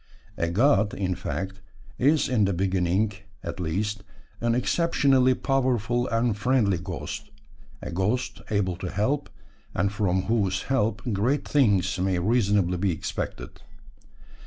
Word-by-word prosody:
A 85 -4 -1
god, 105 +1 +3
in 95 -2 -1
fact, 95 +2 -5 0.4
is 145 +3 +3
in 115 -5 +2
the 100 - 0
beginning, 95 +2 +1 0.3
at - - -5
least, 100 +5 -2 0.4
an 115 0 +1
exceptionally 135 -2 +3
powerful 125 -3 0
and 115 -1 +1
friendly 105 -4 +2
ghost 85 - -6 0.5
a 85 - -5
ghost 110 +8 -1
able 95 -4 0
to 90 -1 -5
help, 135 +11 -1 0.5
and 100 +1 +1
from 95 -3 +1
whose 100 -4 0
help 115 -4 0
great 120 +9 0
things 100 -9 +2
may 95 0 +1
reasonably 100 -2 +2
be 95 +1 +1
expected. 80 - -5
105 Hz, 130 wpm, -26 LUFS, 95-125 Hz, 0.5 s, god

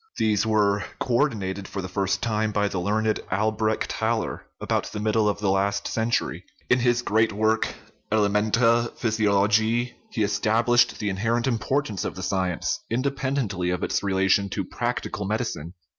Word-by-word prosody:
These 110 0 +2
were 105 -2 +2 0.2
co 125 - -2
ordinated 100 -7 0
for 100 - -6
the - - -4
first 95 +1 -1
time 110 -1 0
by 105 0 +1
the 95 - -3
learned 110 +3 0
Albrecht 110 +2 0
Haller - - -2
about - - -1
the 105 - -5
middle 110 0 +2
of 100 - -1
the 100 -2 +1
last 100 +1 0
century; 115 +1 -1 0.3
in 125 - +5
his 120 0 +2
great 110 +1 +2
work, 110 +2 +1 0.4
Elementa 110 +3 +3
Physiolo 105 -3 +2
giae, 115 +3 +1 0.2
he 110 - -1
established 115 +4 +2
the 105 - -2
inherent 115 +5 0
importance 115 -3 -1
of - - -4
the 95 - -6
sci 95 -1 0
ence, 85 - -2
independently 130 -7 -1
of 90 0 -2
its - - 0
relation 95 0 +2
to - - -3
practical 105 - -3
medi 110 +4 0
cine. 85 -7 -6
110 Hz, 165 wpm, -25 LUFS, 100-115 Hz, 0.4 s, in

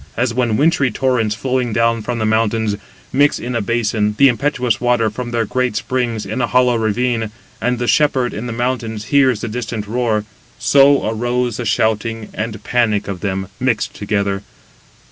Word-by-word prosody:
As 120 0 +1
when 120 -3 +1
wintry 150 -3 +3
torrents 115 -3 0
flowing 125 0 -1
down 115 0 +2
from 120 +3 -3
the 110 - -1
mountains, 110 -1 +1 0.4
mix 145 +2 +3
in 125 - -5
a 115 - 0
basin 105 -1 0
the 140 -1 +7
impetuous 125 -3 0
water 120 -3 +2
from 120 +3 -5
their 115 -1 0
great 125 +1 -1
springs 115 0 -1
in 110 +6 -3
a - - +1
hollow 125 -1 +3
ravine, 115 +1 0 0.3
and 125 +2 +1
the 120 - -2
shepherd 130 -2 +2
in 115 +4 -5
the - - -4
mountains 115 -3 -2
hears 130 -6 +4
the 120 - -3
distant 110 -2 -4
roar—so 120 +4 +1
arose 120 +1 -1
the 120 - -4
shouting 110 +1 0
and 110 -1 -4
panic 115 -4 +1
of 100 -3 -4
them, 95 -1 -2
mixed 125 -3 0
together. 100 -1 -1
115 Hz, 170 wpm, -18 LUFS, 110-125 Hz, 0.4 s, the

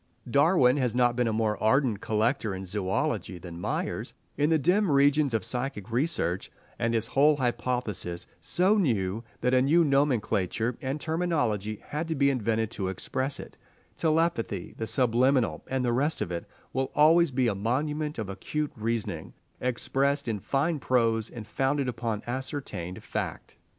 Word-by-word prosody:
Darwin 140 0 +4
has 125 -4 0
not 120 -1 +3
been 125 -1 +1
a - - +1
more 110 -1 0
ardent 115 -2 +2
collector 110 -1 0
in 95 +1 -6
zoology 95 -1 -2
than 85 -1 -9
Myers - - -3 0.2
in 145 +2 +2
the 160 - +4
dim 180 +7 +2
regions 140 0 +4
of 110 -2 0
psychic 125 -5 -3
research, 120 - 0 0.3
and 115 0 +1
his 115 -1 +2
whole 145 +5 +4
hypothesis, 120 -8 -2
so 190 +7 +2
new 110 - 0 0.2
that 125 +1 +1
a 130 - +5
new 160 +6 +4
nomenclature 120 - +1
and 135 +3 -2
terminology 145 - -1
had 155 +3 -2
to 160 - -1
be 140 0 +3
invented 115 -3 0
to 95 -4 -3
express 130 +8 -2
it, - - -10 0.4
telepathy, 155 - 0
the 110 - -4
subliminal, 120 - +2
and 130 -1 -1
the 120 - +1
rest 145 +6 +1
of 90 - -3
it, 85 -1 -4 0.3
will 130 +1 -1
always 165 +3 +6
be 130 -1 +1
a 110 - +1
monument 150 +9 -1
of 110 -3 -3
acute 150 +10 -3
reasoning, 115 0 -3 0.3
expressed 135 +3 0
in 110 -3 -1
fine 145 - 0
prose 115 -4 +1
and 115 -3 -8
founded 135 +4 0
upon 115 -3 -3
ascertained 130 - -4
fact. - - -5
125 Hz, 160 wpm, -28 LUFS, 110-145 Hz, 0.4 s, always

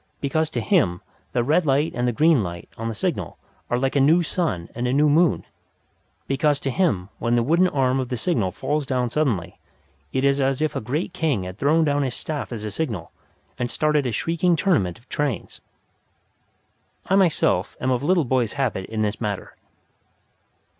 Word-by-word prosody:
Because 155 +3 0
to - - -2
him 120 - +2 0.3
the 120 - +1
red 155 +8 +3
light 145 +2 +2
and 125 +1 -1
the - - +2
green 155 +2 +4
light 85 -3 -5
on 115 - -4
the 115 - -4
signal - - -2 0.3
are 120 - +1
like 135 +2 -1
a - - +4
new 160 +6 +5
sun 155 - -2
and 120 +1 -2
a 125 - 0
new 150 +2 +4
moon. 155 0 +3 0.8
Because 145 +1 +1
to 135 - -1
him 120 - 0
when 115 +1 +1
the 120 - +3
wooden 170 +8 +3
arm 135 -4 +1
of 130 -2 -3
the 125 - -2
signal 110 - 0
falls 145 +7 -2
down 125 -3 0
suddenly, 120 - -1 0.5
it 130 +1 0
is 140 0 +3
as 135 0 +1
if 155 0 -1
a - - -2
great 150 - -3
king 155 - 0
had 90 +2 -8
thrown 155 +3 +3
down 145 -1 +1
his 130 -3 -1
staff 150 -5 -4
as 110 -3 -5
a 105 - -4
signal 105 - -3 0.5
and 120 0 -1
started 150 -1 +1
a - - -1
shrieking 170 +8 +1
tournament 150 - +1
of 120 - -24
trains. 140 -10 -3 1.4
I - - -1
myself 170 - +2
am 130 - 0
of 125 -1 +1
little 170 +1 +2
boys' 125 -3 0
habit 130 -9 -2
in 110 -1 -2
this 105 +2 -2
matter. 105 -3 -4
135 Hz, 195 wpm, -23 LUFS, 115-155 Hz, 1.4 s, new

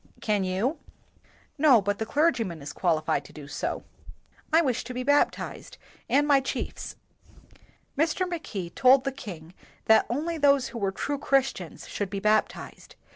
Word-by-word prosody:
"Can 210 -3 0
you?" 205 - -1 0.8
"No, 280 -6 +6
but 205 0 -2
the 220 - -3
clergyman 230 - 0
is 145 - -7
qualified 155 -5 0
to - - -13
do 145 -2 -10
so." - - -3 0.7
"I 320 - +6
wish 255 -6 0
to 250 +1 -7
be 250 - -2
baptized 285 +2 0 0.3
and 290 +1 +3
my 285 -2 +5
chiefs." 265 - -5 1.0
Mr. 330 +5 +1
Mackay 225 - -5
told 260 +6 +5
the 275 - -1
king 175 - -9 0.3
that 220 - +5
only 315 +7 -2
those 280 -2 +4
who 235 - -7
were 195 -2 0
true 285 +8 -3
Christians 265 - -1
should 205 -2 -3
be 200 0 -4
bap 215 +2 +3
tized. - - -12
245 Hz, 160 wpm, -27 LUFS, 195-285 Hz, 1.0 s, No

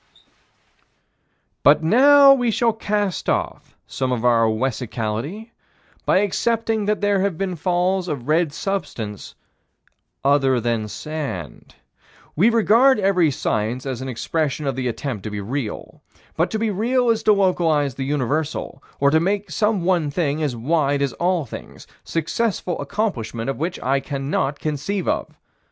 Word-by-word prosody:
But 150 +2 +5
now 275 - +7
we 245 -3 +1
shall 230 +1 +2
cast 205 -3 -2
off - - -3
some 130 -1 -3
of 125 -1 -1
our 115 -2 +4
own 110 -1 0
wessicality 125 - -3 0.6
by 190 - +4
accepting 225 +1 0
that 210 0 0
there 205 -1 +2
have 195 -4 -1
been 190 -1 -2
falls 180 +3 0
of 140 -6 -4
red 160 0 +2
substance 145 - -5 0.9
other 135 -2 +3
than 115 -2 -1
sand. 140 - -6 0.6
We 195 +9 +4
regard 235 +4 +4
every 190 -5 +3
science 115 -1 -2
as 130 -2 -4
an 130 - -5
expression 150 +4 -2
of 135 -2 -1
the 130 -1 -2
attempt 120 -2 -4
to - - -2
be 105 0 -5
real. 115 +2 -5 0.3
But 165 +2 +1
to 220 - -2
be 220 0 0
real 240 +4 +1
is 225 -1 0
to 215 -1 +4
localize 165 -8 +2
the 135 - -4
universal 145 +1 -2 0.2
or 140 0 +4
to 160 - +4
make 195 +1 -1
some 210 +2 +1
one 175 -4 +1
thing 150 0 -1
as 145 -5 -1
wide 140 +3 +1
as 140 - -1
all 175 -3 0
things 115 - -10 0.2
successful 175 +2 -2
accomplishment 135 - -2
of - - -7
which 170 +4 -3
I 135 +2 +2
cannot 135 0 -2
conceive 155 +7 -3
of. - - -2
155 Hz, 150 wpm, -21 LUFS, 135-200 Hz, 0.9 s, now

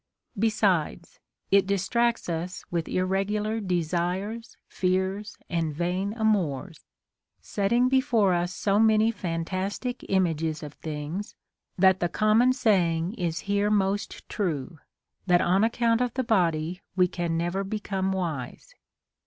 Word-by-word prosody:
Besides, 190 -6 0 0.3
it 195 -1 +5
distracts 235 +5 +1
us 175 +2 -4
Λvith 170 -2 -1
irregular 205 +4 0
desires, 185 +4 -2
fears, 190 +3 -1
and 165 -3 -1
vain 180 +5 -1
amours, 195 - 0 0.6
setting 235 +5 +1
before 255 -7 +3
us 175 0 0
so 200 +2 +1
many 220 0 +4
fantastic 190 +6 -3
images 165 -5 0
of 150 -1 -7
things, 155 +7 -5 0.4
that 190 0 +5
the 175 - 0
com 215 +4 +3
mon 250 +1 +5
saying 180 -8 +1
is 175 -7 -2
here 200 +1 +1
most 205 0 -1
true, 165 - -3 0.5
that 175 -1 +5
on 185 +3 +3
account 230 +1 +2
of 250 -2 -1
the 260 - 0
body 175 -6 +1
we 180 -1 +4
can 170 -2 -2
never 175 +4 -1
become 195 -2 -2
wise. 165 -10 -4
190 Hz, 125 wpm, -26 LUFS, 170-215 Hz, 0.6 s, it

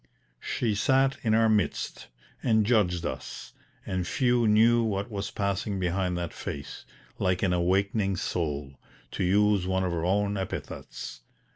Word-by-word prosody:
She 115 -3 -1
sat 135 +6 +2
in 110 -2 +2
our 115 0 +4
midst, 105 -4 0 0.3
and 110 -3 +3
judged 90 -7 +2
us, - - -6 0.3
and 90 -1 -2
few 120 0 +2
knew 115 +3 +5
what 105 0 -2
was 100 -1 -3
passing 100 0 -2
behind 90 0 0
that 85 -2 -4
face 70 0 -7 0.3
"like 90 +1 +1
an 90 -2 +2
awakening 95 +3 +1
soul," 75 -6 -3 0.3
to - - -2
use 100 0 +3
one 95 0 +1
of 90 - 0
her 85 -1 -2
own 100 +3 +1
epithets. 90 -8 -6
100 Hz, 145 wpm, -28 LUFS, 90-110 Hz, 0.3 s, knew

